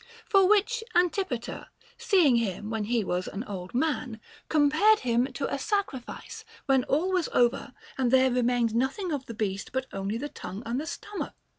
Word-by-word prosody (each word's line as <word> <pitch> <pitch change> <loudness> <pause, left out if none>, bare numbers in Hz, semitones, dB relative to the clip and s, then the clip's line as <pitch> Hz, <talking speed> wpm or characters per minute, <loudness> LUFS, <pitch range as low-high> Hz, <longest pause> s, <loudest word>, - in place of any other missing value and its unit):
For 390 -4 +4
which 430 +3 +3
cause 355 - +6
Antipater, 340 - -3 0.3
seeing 325 - +4
him 210 -1 -2
when 220 -2 -2
he 230 0 +1
was 180 0 -2
an 200 - -5
old 195 -1 -7
man, 255 -5 -1 0.3
compared 315 +9 +4
him 245 0 +2
to 275 +2 -3
a 280 - -1
sacrifice 390 - -3 0.2
when 265 -2 +3
all 335 +7 +1
was 365 -3 +1
over 240 +1 +1 0.2
and 255 -2 +2
there 260 +1 +4
remained 245 -2 +1
nothing 275 - -1
of 280 -3 -3
the 230 - -7
beast 200 -2 -3
but 260 +1 -2
only 195 +3 -2
the 285 +5 -4
tongue 200 -6 -8
and 240 +4 -2
the 315 - -7
stomach. 405 +4 -5
260 Hz, 180 wpm, -27 LUFS, 230-325 Hz, 0.3 s, cause